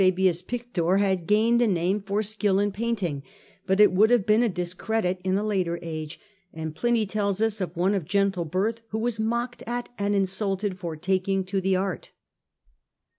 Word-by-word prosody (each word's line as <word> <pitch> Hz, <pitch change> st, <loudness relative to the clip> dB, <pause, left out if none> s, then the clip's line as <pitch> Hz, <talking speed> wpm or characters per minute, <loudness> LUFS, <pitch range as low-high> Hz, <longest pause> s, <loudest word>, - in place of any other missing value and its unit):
Fabius 185 Hz, -2 st, +3 dB
Pictor 195 Hz, -5 st, -1 dB
had 190 Hz, -4 st, +1 dB
gained 225 Hz, +3 st, +3 dB
a 240 Hz, -, +4 dB
name 185 Hz, +1 st, +1 dB
for 200 Hz, +2 st, -1 dB
skill 210 Hz, -2 st, 0 dB
in 205 Hz, +1 st, +1 dB
paint 230 Hz, +1 st, -2 dB
ing, 145 Hz, -5 st, -2 dB, 0.5 s
but 190 Hz, +1 st, +2 dB
it 210 Hz, -, +7 dB
would 205 Hz, +4 st, +4 dB
have 240 Hz, -5 st, +3 dB
been 215 Hz, +2 st, +4 dB
a 240 Hz, -, +2 dB
discredit 180 Hz, +1 st, -2 dB
in 190 Hz, +1 st, +1 dB
a 205 Hz, -, -1 dB
later 185 Hz, -5 st, 0 dB
age; 155 Hz, -1 st, -6 dB, 0.3 s
and 160 Hz, -1 st, -5 dB
Pliny 235 Hz, +2 st, +1 dB
tells 200 Hz, -1 st, -1 dB
us 220 Hz, -2 st, +1 dB
of 175 Hz, -2 st, -4 dB
one 185 Hz, +3 st, +2 dB
of 190 Hz, -6 st, -1 dB
gentle 195 Hz, -1 st, +1 dB
birth 200 Hz, +8 st, -1 dB
who 220 Hz, -, -4 dB
was 225 Hz, 0 st, -1 dB
mocked 235 Hz, +2 st, -2 dB
at 240 Hz, +1 st, -3 dB
and 205 Hz, 0 st, +1 dB
insulted 195 Hz, 0 st, -1 dB
for 170 Hz, -4 st, -4 dB
taking 190 Hz, +3 st, 0 dB
to 190 Hz, +1 st, -2 dB
the 190 Hz, 0 st, +1 dB
art. 190 Hz, +1 st, -3 dB
195 Hz, 190 wpm, -26 LUFS, 185-215 Hz, 0.5 s, it